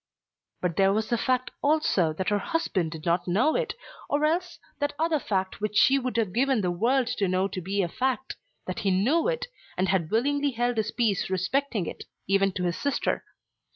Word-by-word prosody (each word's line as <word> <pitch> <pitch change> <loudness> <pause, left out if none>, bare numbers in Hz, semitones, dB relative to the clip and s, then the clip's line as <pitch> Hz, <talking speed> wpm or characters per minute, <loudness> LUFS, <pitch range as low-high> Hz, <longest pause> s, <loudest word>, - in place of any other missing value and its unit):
But 180 -3 -1
there 195 0 +5
was 215 +2 0
the 235 - +2
fact 255 -1 0
also 285 - +2
that 185 +4 -2
her 205 0 +2
husband 195 - -1
did 155 -1 -8
not 175 +1 +1
know 235 - +2
it, - - -1 0.3
or 295 +1 +2
else 350 +3 0 0.2
that 290 -1 -1
other 320 -1 +1
fact 190 -5 -2
which 210 0 -2
she 275 -2 +6
would 255 -2 -3
have 215 -6 0
given 260 0 +2
the 180 -2 0
world 245 +9 +2
to 200 - +1
know 185 +1 +1
to 185 -1 -5
be 195 +3 0
a - - 0
fact, 265 +7 -2 0.3
that - - -4
he 200 - 0
knew 240 - +2
it, - - -1 0.3
and 185 0 +1
had 175 -4 +1
willingly 285 +5 +1
held 240 0 0
his 215 0 0
peace 220 -5 0
respecting 195 +3 0
it, - - -7 0.2
even 195 +1 +3
to 180 - -3
his 175 -1 -1
sister. 285 -1 0
220 Hz, 205 wpm, -27 LUFS, 190-275 Hz, 0.3 s, she